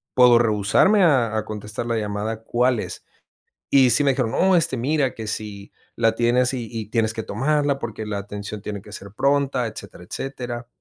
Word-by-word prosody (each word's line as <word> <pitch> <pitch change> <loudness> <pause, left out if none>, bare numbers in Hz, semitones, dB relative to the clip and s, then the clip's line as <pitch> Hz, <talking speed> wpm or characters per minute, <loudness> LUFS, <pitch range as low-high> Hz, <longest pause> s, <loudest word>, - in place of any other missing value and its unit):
¿Puedo 125 -2 +7
rehusarme 115 - +3
a 120 -9 +3
a 110 - -2
contestar 105 +2 -5
la 115 -1 -1
llamada? 105 +1 -3
¿Cuál 125 +1 +1
es?". - - -7 0.6
Y 135 -2 +5
sí 120 +6 +4
me 140 - +4
dijeron: 125 -4 -1
No, 190 +7 +3
este, 160 -6 +1
mira 135 +2 0
que 110 -2 -7
si 105 -2 -5 0.2
la 115 0 +2
tienes 120 +2 +2
y 120 -3 -4
y 110 -2 -4
tienes 110 -1 0
que 110 -1 -4
tomarla 140 +4 0
porque 110 -3 -5
la 105 -1 -3
atención 100 +1 -7
tiene 105 -1 -6
que 105 - -14
ser 100 -2 -8
pronta." 140 0 +1
Etcétera, 100 -4 -9
etcétera. 125 -3 -5
115 Hz, 190 wpm, -22 LUFS, 105-130 Hz, 0.6 s, Puedo